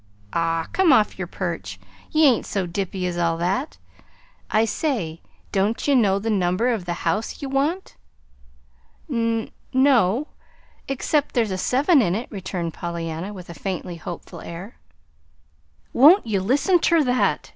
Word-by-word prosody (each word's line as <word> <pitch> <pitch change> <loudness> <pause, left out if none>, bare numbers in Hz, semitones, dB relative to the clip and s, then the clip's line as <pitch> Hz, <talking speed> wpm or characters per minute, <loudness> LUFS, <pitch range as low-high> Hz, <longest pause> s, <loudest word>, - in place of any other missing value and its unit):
"Aw, 165 -1 0
come 375 -4 +4
off 215 -6 +3
yer 180 - -3
perch! 165 - -5 0.3
Ye 310 0 +4
ain't 255 -5 +3
so 195 -3 -1
dippy 185 +1 -3
as 175 -1 -2
all 165 -1 +1
that. 190 - -2 0.7
I 220 +1 +3
say, 215 - -2 0.3
don't 205 +7 0
ye 285 - +4
know 205 -7 +4
the 220 +3 -2
number 190 +4 +1
of 220 -7 -1
the 175 -1 -4
house 215 +2 -1
ye - - -5
want?" 285 +8 -1 1.1
"N 230 -2 -1 0.2
no, 260 -2 +3 0.6
except 280 +2 -1
there's 225 -4 +2
a 185 - -2
seven 280 - +3
in 180 -5 +1
it," 230 +4 -5
returned 180 -4 -4
Pollyanna, 170 +2 -5
with 185 -4 -10
a 170 - -8
faintly 180 +1 -5
hopeful 170 +1 -8
air. 180 +7 -9 1.2
"Won't 310 - +7
ye 210 -4 0
listen 280 - +2
ter 335 -1 +3
that?" 250 -1 +1
210 Hz, 150 wpm, -23 LUFS, 175-260 Hz, 1.2 s, Won't